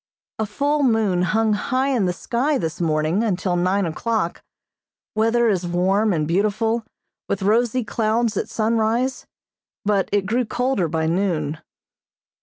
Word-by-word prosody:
A 220 - 0
full 285 +7 0
moon 220 -8 +2
hung 215 +4 +2
high 255 +6 0
in 245 -8 +1
the - - +1
sky 260 - -1
this 165 -2 -3
morning 160 +5 +1
until 185 -4 0
nine 185 +3 +1
o'clock. 170 +2 -2 0.7
Weather 230 +2 +2
is 185 -5 0
warm 190 +5 +2
and 155 -4 0
beautiful, 215 +6 +1 0.5
with 200 - -1
rosy 235 +4 +2
clouds 225 +1 0
at - - -2
sunrise, 230 +3 0 0.6
but 200 -2 +1
it 200 -1 +1
grew 235 +5 +1
colder 245 -6 0
by 160 0 -1
noon. 160 -3 -1
210 Hz, 140 wpm, -22 LUFS, 180-230 Hz, 0.7 s, moon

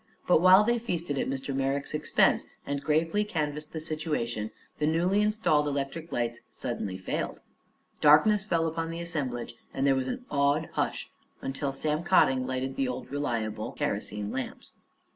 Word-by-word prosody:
But 175 - +5
while 185 +3 +8
they 235 +2 +2
feasted 170 - -2
at - - -1
Mr. 135 +1 -3
Merrick's 135 +2 -1
expense 150 - +3 0.2
and 140 0 -2
gravely 160 +7 +1
canvassed 150 -6 -3
the 160 - -4
situation, 150 -9 -2 0.3
the 150 - +2
newly 175 +6 +2
installed 180 -9 +2
electric 145 +3 -3
lights 120 -1 -1
suddenly 95 -2 -4
failed. 95 - -3 0.6
Darkness 195 +8 +6
fell 170 -5 +1
upon 165 0 -2
the 165 0 -5
assemblage 140 -9 -3 0.2
and 135 - +1
there 140 - +5
was 130 -1 -1
an 250 0 -4
awed 140 +1 +2
hush - - -2 0.3
until 135 +1 -2
Sam 150 +3 -1
Cotting 130 -8 +4
lighted 130 +1 -3
the 135 - +1
old 125 +1 -5
reliable 115 -7 -2
kerosene 105 0 -3
lamps. - - -5
150 Hz, 160 wpm, -28 LUFS, 135-170 Hz, 0.6 s, while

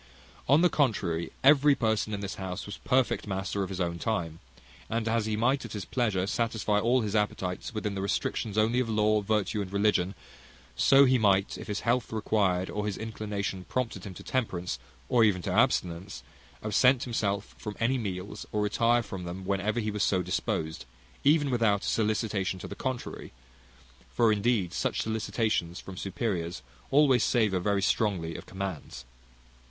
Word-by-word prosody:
On 145 +4 +6
the 180 - +6
contrary, 95 - 0
every 145 +1 +6
person 110 -2 0
in 100 -1 -3
this 100 -1 -4
house 90 0 -4
was 100 - -7
perfect 130 -4 +1
master 95 0 -2
of 95 - -2
his 95 -1 -5
own 85 -1 -1
time: 85 -8 -2 0.5
and 115 0 -1
as 115 -1 +1
he 110 -1 -1
might 130 +5 +2
at - - -8
his 105 -3 -5
pleasure 105 -7 0
satisfy 110 -1 0
all 120 +4 +3
his 105 -1 -2
appetites 95 -3 -1
within 105 -2 -3
the 95 - -3
restrictions 100 +2 -2
only 110 +3 +3
of 125 -3 -1
law, 105 -1 +2
virtue, 105 0 0
and 95 -2 -5
religion; 100 -2 +1 0.6
so 135 - +6
he 130 -1 +3
might, 100 -2 +3
if - - -8
his 105 -1 -3
health 120 +2 0
required, 100 -4 +1
or 105 0 -3
his 100 - -3
inclination 105 -3 -4
prompted 115 -7 -3
him 95 -3 -8
to - - -10
temperance, 90 -9 -2 0.3
or 120 -2 +4
even 105 -4 +3
to 95 - -2
abstinence, 95 -5 0 0.4
absent 125 +4 +4
himself 105 -4 -2
from 105 -1 -6
any 125 +3 +1
meals, 95 -3 -5
or 105 -1 0
retire 115 +3 +2
from 95 -4 -7
them, 90 +2 -6
whenever 100 +4 0
he 110 -2 -1
was 105 0 -3
so 95 -3 +2
disposed, 80 -5 -2 0.4
without - - +5
even 145 -4 +2
a 110 -4 +3
sollicitation 105 -3 0
to - - -7
the - - -6
contrary: 130 - -5 0.8
for, 115 - +3
indeed, 105 -4 +1
such - - -1
sollicitations 110 -5 -1
from 95 - -9
superiors 90 - -3 0.3
always 135 -4 +5
savour 105 -6 +2
very 100 +1 0
strongly 95 -7 0
of - - -9
commands. 90 -10 -6
105 Hz, 175 wpm, -28 LUFS, 95-115 Hz, 0.8 s, On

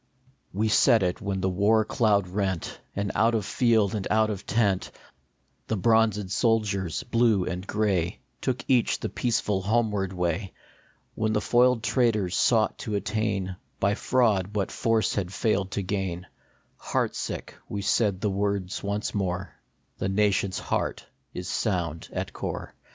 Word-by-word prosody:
We 105 +4 0
said 110 0 +5
it 90 +2 -1
when 100 -2 -2
the 95 - +1
war 105 +4 +3
cloud 105 -4 +2
rent, 95 -2 -2 0.2
And 100 0 -1
out 115 +1 +3
of 105 -4 -1
field 110 -4 +2
and 105 -3 -2
out 110 0 +3
of 100 -1 -6
tent 100 -3 +1 0.8
The 110 - -1
bronzed 110 -2 +2
soldiers, 100 -6 +1
Blue 115 -5 +2
and 90 +2 -4
Gray, 95 -5 0 0.2
Took 125 -2 -2
each 125 -3 +2
the - - -3
peaceful 105 -5 0
homeward 105 -2 0
way; 90 +1 -2 0.6
When 110 0 0
the 105 - +2
foiled 120 +1 +3
traitors 110 -7 +1
sought 110 -3 +2
to 110 -5 -3
attain 100 -3 -1 0.2
By 100 +1 +2
fraud 105 -5 +1
what 100 -2 -1
force 115 -1 +1
had 95 -3 -2
failed 100 -2 0
to 100 - -1
gain, 95 -2 -3 0.5
Heart - - -1
sick, - - -5 0.2
we 100 - -3
said 100 -4 +1
the 105 - +1
words 100 -1 -1
once 100 +1 -2
more: 95 -3 -2 0.5
"The 95 - -1
nation 100 0 +2
s - - -4
heart - - -2 0.3
is 90 0 -5
sound 85 -6 -2
at - - -4
core." - - -5
100 Hz, 155 wpm, -26 LUFS, 95-110 Hz, 0.8 s, said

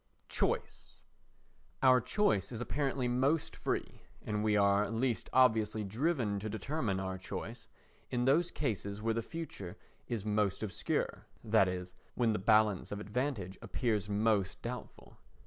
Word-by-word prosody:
Choice - - -2 0.9
Our 130 -1 +7
choice 120 - +1
is 115 - -5
apparently 135 0 -1
most 140 +6 +1
free, - - -3 0.2
and 105 0 -1
we 105 -1 +3
are 100 0 +3
least 115 +1 -1
obviously 110 -4 +3
driven 115 - 0
to 110 +2 -4
determine 110 -1 -2
our 95 -1 -3
course, 115 +5 -6 0.4
in 125 0 0
those 165 +6 +4
cases 100 -6 -2
where 115 +1 0
the 115 - -1
future 115 - -7 0.3
is 110 -4 -3
most 105 -1 +1
obscure, 105 - -2 0.2
that 110 -3 +4
is, 90 0 -4 0.2
when 115 -3 +2
the 105 - -1
balance 105 -1 +3
of 105 - -3
advantage 105 -3 -3
appears 105 -5 -1
most 105 -2 +1
doubtful. 125 +1 -7
110 Hz, 140 wpm, -33 LUFS, 100-125 Hz, 0.9 s, Our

